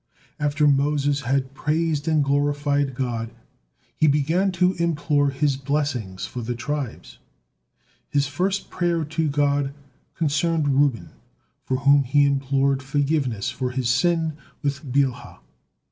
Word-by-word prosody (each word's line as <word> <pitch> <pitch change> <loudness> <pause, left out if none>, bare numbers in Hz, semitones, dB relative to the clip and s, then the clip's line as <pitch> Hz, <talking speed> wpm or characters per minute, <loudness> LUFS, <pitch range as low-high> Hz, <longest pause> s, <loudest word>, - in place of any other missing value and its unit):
After 150 0 +2
Moses 145 0 +2
had 130 +1 -1
praised 155 +1 -1
and 155 -2 +3
glorified 145 -1 0
God, 120 -3 -2 0.7
he 155 - +3
began 160 +7 +2
to 180 +1 +2
implore 145 -3 +1
His 140 0 0
blessing 135 -8 -2
for 125 - -5
the 120 +2 -3
tribes. 140 +1 -5 0.9
His 140 -1 +1
first 185 +8 -2
prayer 170 -3 0
to 160 +1 -1
God 140 -1 0 0.4
concerned 160 0 +1
Reuben, 140 -3 +1 0.5
for 130 - 0
whom 140 +1 +5
he 145 +3 +3
implored 135 0 +1
forgiveness 135 -4 -1
for 130 -2 -3
his 125 -1 -2
sin 165 +4 +2 0.3
with 140 +1 -2
Bilhah. 135 -2 0
145 Hz, 125 wpm, -23 LUFS, 135-150 Hz, 0.9 s, whom